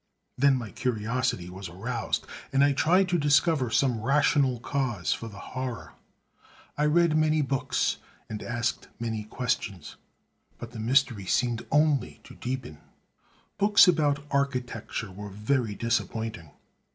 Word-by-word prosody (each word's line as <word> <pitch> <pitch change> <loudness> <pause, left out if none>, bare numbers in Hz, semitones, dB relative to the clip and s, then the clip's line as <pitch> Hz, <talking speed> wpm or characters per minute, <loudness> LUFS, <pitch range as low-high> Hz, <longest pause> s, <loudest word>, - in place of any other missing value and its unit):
Then 140 +1 +4
my 115 -5 -6
curiosity 120 -4 -1
was 90 +1 -8
aroused; 115 +7 -3 0.3
and 135 0 +4
I 140 0 +4
tried 180 +7 +3
to 175 -1 +2
discover 145 -2 +3
some 120 -2 +1
rational 135 0 +2
cause 120 - -1
for 115 - -6
the 100 -3 -10 0.2
horror. 125 - -5 0.8
I 150 - +1
read 170 +1 +3
many 155 -1 +3
books, 135 -1 0 0.3
and 105 -1 -6
asked 120 0 -2
many 110 -2 -3
questions; 110 - -3 0.6
but 120 - -8
the 120 - -8
mystery 120 -4 +2
seemed 120 +1 0
only 145 - +2
to - - -13
deepen. 125 - -5 0.8
Books 205 0 +6
about 145 -4 +2
architecture 125 -6 -2
were 105 +2 -8
very 105 +2 -1
disappointing. 110 -6 -2
125 Hz, 130 wpm, -27 LUFS, 110-140 Hz, 0.8 s, Books